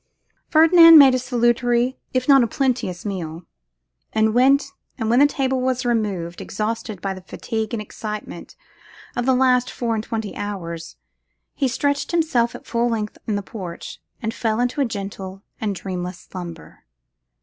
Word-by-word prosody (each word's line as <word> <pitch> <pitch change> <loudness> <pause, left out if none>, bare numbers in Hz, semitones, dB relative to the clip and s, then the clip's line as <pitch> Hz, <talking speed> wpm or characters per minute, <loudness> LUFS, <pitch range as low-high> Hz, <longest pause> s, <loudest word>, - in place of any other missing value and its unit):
Ferdinand 330 +1 +8
made 275 -3 +8
a 255 - +1
salutary, 240 0 +1
if 255 -1 -1
not 275 -2 +7
a 235 - +2
plenteous 240 -9 -1
meal; 175 -4 -5 0.7
and 220 0 +2
when 260 +3 +5 0.4
the 240 +4 +4
table 265 -2 -1
was 255 0 -1
removed, 200 -8 -1
exhausted 215 0 -4
by 195 0 -2
the 185 - -10
fatigue 220 +3 -4
and 225 -3 -3
excitement 210 0 -7 0.6
of 245 +1 -2
the 260 - +4
last 250 -1 +3
four 235 -2 -2
and 215 -1 -2
twenty 225 -2 -4
hours, 170 -5 -6 0.6
he 275 - 0
stretched 285 +3 -1
himself 310 -9 +1
at - - -11
full 235 0 0
length 215 -2 -3
in 215 - 0
the 205 - -2
porch, 185 -5 -8 0.2
and 225 0 -2
fell 220 -1 -1
into 245 +4 0
a - - +3
gentle 195 -3 -6 0.2
and 205 -3 -1
dreamless 180 -1 -5
slumber. 175 -3 -10
230 Hz, 155 wpm, -22 LUFS, 200-255 Hz, 0.7 s, Ferdinand